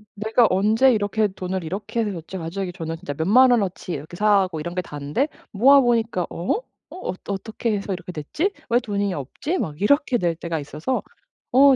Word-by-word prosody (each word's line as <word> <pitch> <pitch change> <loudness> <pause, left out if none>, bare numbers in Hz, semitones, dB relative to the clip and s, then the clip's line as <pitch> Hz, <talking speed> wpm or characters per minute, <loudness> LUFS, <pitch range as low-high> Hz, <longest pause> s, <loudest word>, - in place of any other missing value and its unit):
내가 220 +3 +3
언제 220 +7 +4
이렇게 210 -1 +1
돈을 185 -1 -4
이렇게 200 +7 -3
해서 205 -4 -3
어찌 170 +4 -7
갑자기 180 +2 -4
저는 165 -3 -4
진짜 170 -3 -5
몇 160 +4 -2
만 255 +5 +7
원어치 195 -6 0
이렇게 155 +5 -7
사고 195 -5 +2
이런 170 +3 -4
게 180 - 0
다인데 150 - -2 0.2
모아보니까 235 -5 +4
'어? 175 - -1
어 - - -6 0.3
어 370 - -4
어떻게 215 +3 -2
해서 200 -1 -3
이렇게 180 0 -6
됐지? 180 - -2 0.2
왜 240 +1 +4
돈이 205 -4 -1
없지?' 220 - -3
막 150 -1 -4
이렇게 285 +3 +3
될 170 -3 +1
때가 165 -1 -3
있어서 150 - -3 0.5
어 275 +1 +7
195 Hz, 375 characters per minute, -23 LUFS, 170-230 Hz, 0.5 s, 만